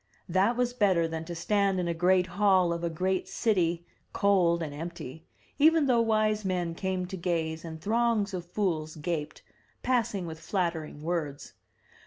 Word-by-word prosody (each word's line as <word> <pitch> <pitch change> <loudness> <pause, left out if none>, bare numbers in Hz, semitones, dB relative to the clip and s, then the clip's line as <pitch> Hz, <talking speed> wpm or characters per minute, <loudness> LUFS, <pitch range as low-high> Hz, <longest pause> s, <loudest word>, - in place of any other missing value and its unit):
That 195 +7 +2
was 245 -1 +1
better 190 -8 +2
than 160 0 -5
to 170 +1 -6
stand 195 +2 +1
in 175 - -1
a 170 - 0
great 180 +2 +3
hall 185 -1 +3
of 170 0 -5
a 170 - 0
great 185 +3 -1
city, 175 -6 0 0.3
cold 175 -4 +3
and 150 -2 -5
empty, 160 -1 -8 0.3
even 315 +1 +5
though 245 -3 +3
wise 215 -1 +1
men 180 -3 -1
came 185 +1 -2
to 190 +2 -6
gaze 165 -3 -2
and 160 -1 -7
throngs 220 +1 +1
of 175 -2 -5
fools 170 -6 -1
gaped, 155 -1 -4 0.4
passing 230 -7 0
with 160 -1 -7
flattering 165 -5 -3
words. 155 -4 -3
180 Hz, 165 wpm, -28 LUFS, 165-200 Hz, 0.4 s, even